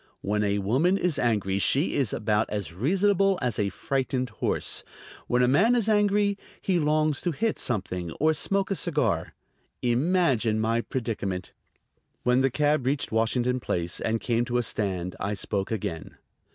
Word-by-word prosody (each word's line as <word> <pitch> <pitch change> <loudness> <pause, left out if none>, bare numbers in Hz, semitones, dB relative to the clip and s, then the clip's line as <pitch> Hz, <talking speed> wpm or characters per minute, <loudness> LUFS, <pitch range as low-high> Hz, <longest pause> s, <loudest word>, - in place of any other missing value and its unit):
When 105 +1 0
a 100 0 +1
woman 130 - +2
is 175 -7 0
angry 100 -5 +1
she 140 - +2
is 135 -6 +1
about 105 0 0
as 100 -5 -4
reasonable 195 - +2
as 120 -5 -1
a 100 -1 +1
frightened 130 0 -2
horse; 105 - -1 0.4
when 125 +1 +2
a - - +4
man 205 - +4
is 230 -3 +1
angry 205 -1 +2 0.2
he 185 -3 +1
longs 155 -1 +1
to 175 - 0
hit 220 +9 -1
something 90 -7 -2
or 155 +2 +2
smoke 195 +5 -1
a - - +1
cigar. 150 - 0 0.5
Imagine 125 -4 +2
my 115 +1 +1
predicament! 110 -8 -4 0.7
When 125 +1 +3
the 135 - +3
cab 145 0 +1
reached 140 +1 0
Washington 120 +3 +1
Place 85 -6 -2
and 115 +1 -1
came 120 0 0
to 125 -1 -1
a 120 - +1
stand 95 -5 -3
I 105 +1 -2
spoke 100 0 -2
again. 85 -7 -4
125 Hz, 165 wpm, -26 LUFS, 105-155 Hz, 0.7 s, a